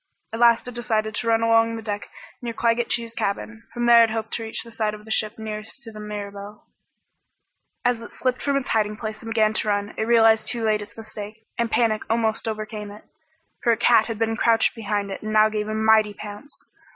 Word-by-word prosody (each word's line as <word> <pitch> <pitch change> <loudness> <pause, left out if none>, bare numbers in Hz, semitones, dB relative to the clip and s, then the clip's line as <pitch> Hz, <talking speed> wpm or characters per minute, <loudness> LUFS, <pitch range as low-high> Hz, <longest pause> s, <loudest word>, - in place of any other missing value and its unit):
At 225 - -3
last 235 0 +5
it 250 - -6
decided 220 -2 -1
to 230 - -3
run 225 0 +3
along 230 0 +3
the 225 - -7
deck 205 -1 -4 0.3
near 235 -1 -4
Claggett 230 +1 +1
Chew's 230 -1 -1
cabin. 225 +2 -3
From 240 0 -2
there 235 -1 +8
it 225 - +2
hoped 220 0 -3
to - - -2
reach 220 - -4
the 230 - -13
side 215 -2 -1
of 210 0 -14
the 220 - -9
ship 215 0 +1
nearest 220 +4 -7
to 225 - -8
the 215 - -10
Mirabelle. 205 0 -7 1.2
As 245 -2 +2
it 230 - -9
slipped 255 -1 -1
from 280 -1 +1
its 275 - -3
hiding 215 -1 +1
place 215 -1 -5
and 225 - -7
began 220 -1 +3
its 220 - 0
run, 205 -1 -1
it 220 - 0
realized 225 -1 +5
too 235 -2 -2
late 215 -1 +2
its 205 +1 -11
mistake, 215 0 -9
and 235 -1 +1
panic 225 -2 +2
almost 225 -1 0
overcame 215 -1 -4
it. 205 +1 -12 0.6
For 235 - +3
a - - -1
cat 230 -1 +4
had 225 -2 -4
been 225 +1 0
crouched 230 -1 +3
behind 205 -3 -2
it - - -6
and 215 0 -4
now 215 0 +6
gave 210 -1 -2
a 215 - -3
mighty 220 -1 +4
pounce. 210 +8 -10
220 Hz, 225 wpm, -23 LUFS, 215-230 Hz, 1.2 s, there